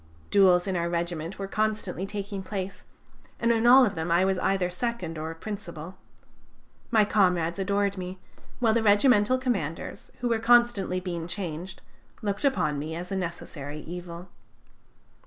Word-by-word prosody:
Duels 185 -3 +5
in 190 -2 -1
our 170 -1 0
regiment 170 0 -3
were 195 - -4
constantly 210 -3 -1
taking 200 -1 -5
place, 190 0 -5 0.5
and 235 0 +2
in 230 0 +2
all 255 +1 +9
of 205 - -1
them 160 -2 -3
I 175 +2 +4
was 190 -1 +1
either 190 -1 +1
second 185 -4 -3
or 160 +1 -4
principal. 180 -3 -7 0.9
My 220 -3 +4
comrades 180 -4 +2
adored 200 0 0
me, 185 +1 -6 0.4
while 230 -3 +3
the 230 - +2
regimental 210 +2 +4
commanders, 200 - -3
who 245 - 0
were 230 -1 +1
constantly 235 -5 +3
being 170 -3 -4
changed, 175 -1 -5 0.4
looked 205 +2 -2
upon 155 - +1
me 155 +2 -4
as 180 +2 -6
a - - -1
necessary 155 -5 -5
evil. 175 +1 -8
190 Hz, 155 wpm, -27 LUFS, 170-210 Hz, 0.9 s, all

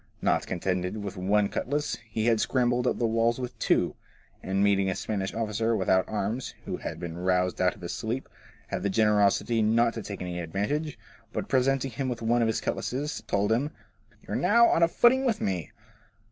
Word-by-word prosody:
Not - - +1
contented 90 +2 -2
with 100 -1 -5
one 100 +2 +2
cutlass, 145 +7 -2
he 110 0 -1
had 115 -2 +3
scrambled 125 -1 +1
up - - +1
the 120 - 0
walls 115 +2 +1
with 125 -1 -6
two, - - +2 0.5
and 95 +1 0
meeting 100 -1 +3
a 95 - -1
Spanish 100 -3 -3
officer 115 0 0
without 95 -2 +2
arms, 110 +4 -3
and - - -29
who - - -3
had - - -6
been 85 -1 -5
roused 90 -1 +1
out 90 -1 +2
of 100 - -17
his 85 0 -4
sleep, 115 +7 -3 0.4
had - - -3
the 100 - 0
generosity 105 +2 +3
not 115 +2 +3
to 115 - -5
take 100 -3 -6
any 90 -1 -4
advantage, 105 - -2 0.3
but - - -3
presenting 135 0 +1
him 130 +3 -3
with 120 -2 -4
one 120 +2 +2
of 115 - +3
his 110 - 0
cutlasses, 145 +4 -3
told 100 +1 +1
him, 130 +6 +1 0.3
* - - -32
You - - -5
are - - 0
now 235 +6 +5
on - - +2
a 170 - +6
footing 245 +9 +4
with 230 -5 +1
me.' 90 -4 -2
110 Hz, 205 wpm, -27 LUFS, 95-125 Hz, 0.5 s, a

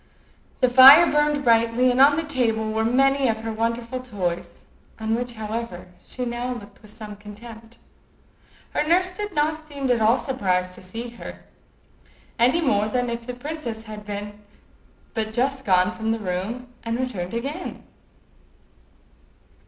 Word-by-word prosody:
The 255 - +5
fire 265 +6 +10
burned 295 -1 +1
brightly, 230 +1 +3
and 250 +2 +2
on 285 +1 +7
the 325 - -1
table 230 -7 0
were 220 +1 0
many 270 +3 +3
of 220 -1 -1
her 225 0 -4
wonderful 230 +2 -2
toys, 190 -9 -5 0.3
on 220 0 -1
which, 245 +1 -2
however, 220 -4 -5
she 250 - -5
now 245 +1 -3
looked 205 -4 -12
with 215 - -14
some 210 -1 -9
contempt. 225 +3 -12 0.9
Her - - 0
nurse 360 +4 +2
did 415 +2 -5
not 310 +1 0
seem 280 -3 -2
at 235 -2 +2
all 225 +4 +4
surprised 185 -9 -1
to - - -11
see 225 +6 -7
her, 235 - -10 1.0
any 250 +8 +4
more 210 -9 +2
than 245 +2 -1
if 235 0 -6
the 250 - -5
princess 245 -5 -6
had 215 -1 -9 1.1
but 220 -2 -3
just 265 +3 -1
gone 185 -1 +3
from 220 -1 -4
the 225 - 0
room 210 +5 -4
and 230 +1 -3
returned 225 -7 -3
again. 285 +9 -5
235 Hz, 150 wpm, -23 LUFS, 220-265 Hz, 1.1 s, fire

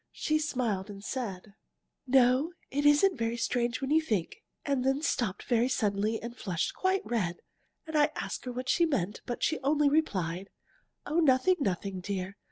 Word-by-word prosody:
She 310 0 0
smiled 235 -10 -1
and 200 -1 -9
said: 205 -5 -5 0.5
"'No, 260 +5 +4 0.2
it 290 +2 +2
isn't 295 +2 +4
very 230 +1 -1
strange 240 +1 -1
when 270 +1 -2
you 320 +1 +5
think 225 - -2
' - - -49
and 275 -3 0
then 270 +3 +1
stopped 220 - -1
very 240 +1 +2
suddenly 215 -2 0
and 235 +1 -7
flushed 185 -7 -2
quite 380 +1 0
red. 185 -8 -1 0.5
And 315 -1 -6
I 295 0 +5
asked - - -4
her 250 - -3
what 255 +1 -5
she 340 +6 +3
meant, 210 - -1
but 240 - -4
she 315 - +1
only 285 +2 +3
replied: 195 - 0 0.6
'Oh, 310 +3 +1
nothing, 315 +4 +4
nothing, 195 - -2
dear! 190 0 -4
250 Hz, 175 wpm, -30 LUFS, 200-290 Hz, 0.6 s, you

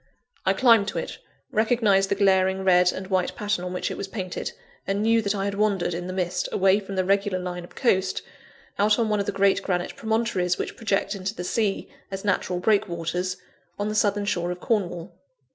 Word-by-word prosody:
I - - +5
climbed 230 -5 +5
to - - -3
it, - - -4 0.3
recognised 215 -4 +3
the - - +2
glaring 190 -1 +3
red 180 -1 +5
and 190 - -6
white 185 -1 0
pattern 205 -3 -1
in 180 - -4
which 180 - -2
it - - -5
was 200 - -4
painted, 190 -3 -4 0.4
and 200 +1 0
knew 225 +1 +4
that 205 -1 -1
I 195 0 -1
had 200 - -1
wandered, 200 -4 +1
in 175 +1 -4
the - - -4
mist, 180 -1 -2
away 190 +1 +4
from 195 -1 -7
the 185 -1 +1
regular 195 0 +1
line 180 -1 -5
of 175 - -14
coast, 190 -7 +1 0.6
out 210 +1 +4
on 230 -2 +1
one 210 -1 +1
of 200 - -2
the - - +1
great 200 0 +3
granite 180 -2 -2
promontories 220 -6 0
which - - -4
project 200 -2 0
into 195 +1 -4
the 180 - -5
sea, 205 +1 -1 0.2
as 195 0 -6
natural 185 -2 0
breakwaters, 180 -3 0 0.4
on 205 +1 -1
the - - -2
southern 205 -1 +1
shore 175 -3 -1
of 180 0 -4
Cornwall. 180 -4 -2
195 Hz, 210 wpm, -25 LUFS, 185-210 Hz, 0.6 s, I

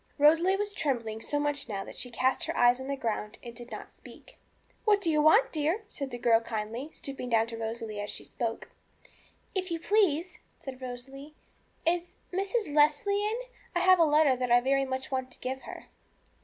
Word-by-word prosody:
Rosalie 325 +6 +5
was 410 +1 -2
trembling 230 - -2
so 290 +5 -1
much 290 -2 -1
now 195 -2 -3
that - - -9
she 250 - -2
cast 255 +2 +1
her - - -3
eyes 245 +1 +5
on 260 - -6
the 280 - -1
ground 220 -4 -3
and 235 - -8
did 240 +1 -10
not - - -8
speak. - - -16 0.4
'What 420 -2 +4
do 335 -5 0
you 305 -1 +3
want, 320 +11 +5
dear?' 320 +7 0
said 275 -9 -5
the 245 - -5
girl 230 -1 +4
kindly, 230 +4 -4
stooping 270 -5 -6
down 225 -1 +3
to 230 0 -7
Rosalie 225 -1 -4
as 205 - -4
she - - -6
spoke. 230 -2 -4 0.8
'If 370 -1 -2
you 335 -1 -2
please,' 360 -3 +1 0.2
said 265 -1 -8
Rosalie, 270 +4 -8 0.5
'is 350 +1 0 0.2
Mrs. 390 -2 -1
Leslie 305 +8 +3
in 430 +2 0
I - - -25 0.3
I - - +3
have 370 0 +6
a - - +7
letter 300 -3 +4
that 250 0 -2
I 240 - +6
want 245 - +4
very 275 +1 +2
much 260 0 -3
to 260 -1 -3
give 265 +1 -4
her.' - - -9
275 Hz, 205 wpm, -29 LUFS, 240-335 Hz, 0.8 s, a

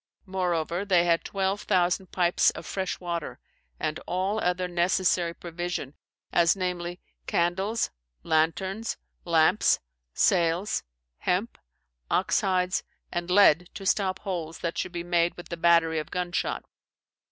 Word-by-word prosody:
"Moreover 180 -2 -1
they 185 -4 +4
had 170 -1 +2
12,000 190 -2 0
pipes 175 -1 +3
of - - -7
fresh 190 -2 -3
water, 170 -3 -4 0.4
and 155 0 -2
all 190 +4 0
other 180 -2 0
necessary 175 0 +2
provision, 175 -4 -4 0.4
as, 170 +1 +5
namely, 180 -2 -3 0.3
candles, 190 +6 0 0.3
lanternes, 190 +7 0 0.3
lampes, 165 -2 +4 0.4
sailes, 175 +2 +2 0.5
hempe, 190 +6 0 0.5
oxe - - +2
hides, 185 -1 +1 0.3
and 175 0 -3
lead 180 -3 +5
to 195 - -7
stop 190 -1 +1
holes 170 -5 -4
that 170 - -3
should 185 - -2
be 170 -1 -4
made 175 -1 +1
with 175 - -10
the 170 - -3
battery 165 -1 +4
of 155 - -6
gun 180 -1 -2
shot. - - -2
175 Hz, 130 wpm, -27 LUFS, 170-185 Hz, 0.5 s, as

